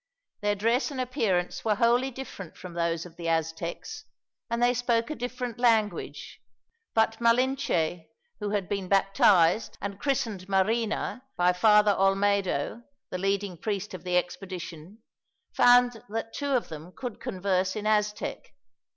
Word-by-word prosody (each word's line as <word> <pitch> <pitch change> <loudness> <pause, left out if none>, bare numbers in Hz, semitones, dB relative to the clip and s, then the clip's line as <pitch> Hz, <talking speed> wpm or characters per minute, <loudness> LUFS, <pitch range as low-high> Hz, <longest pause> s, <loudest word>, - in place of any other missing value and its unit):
Their 205 0 +1
dress 230 +8 +1
and 275 -3 -6
appearance 225 -9 -1
were 215 -2 +2
wholly 240 +4 +3
different 240 -9 -9
from 180 -2 -9
those 170 -1 -1
of 175 - -13
the 170 -1 -3
Aztecs, 165 - -3 0.4
and 235 0 -1
they 245 +1 +4
spoke 240 +1 0
a - - -3
different 245 -2 -5
language, 225 -4 0 0.5
but 225 0 +2
Malinche 230 -9 +1 0.3
who 210 -1 -3
had 200 -3 -1
been 200 -2 -3
baptized, 195 -1 +3
and 200 0 -5
christened 230 -9 -2
Marina, 220 +5 0
by 180 0 +4
Father 210 +2 +5
Olmedo, 195 -1 +1 0.3
the 185 - -3
leading 195 -1 -1
priest 205 0 -3
of 180 -3 -8
the 180 -1 +1
expedition 180 +1 -5 0.5
found 245 -1 +5
that 225 +1 -4
two 285 -1 -3
of 255 -4 +1
them 160 +2 -9
could 245 -5 -6
converse 190 -5 -1
in 215 -1 -4
Aztec. 210 -1 -1
205 Hz, 140 wpm, -27 LUFS, 185-235 Hz, 0.5 s, Father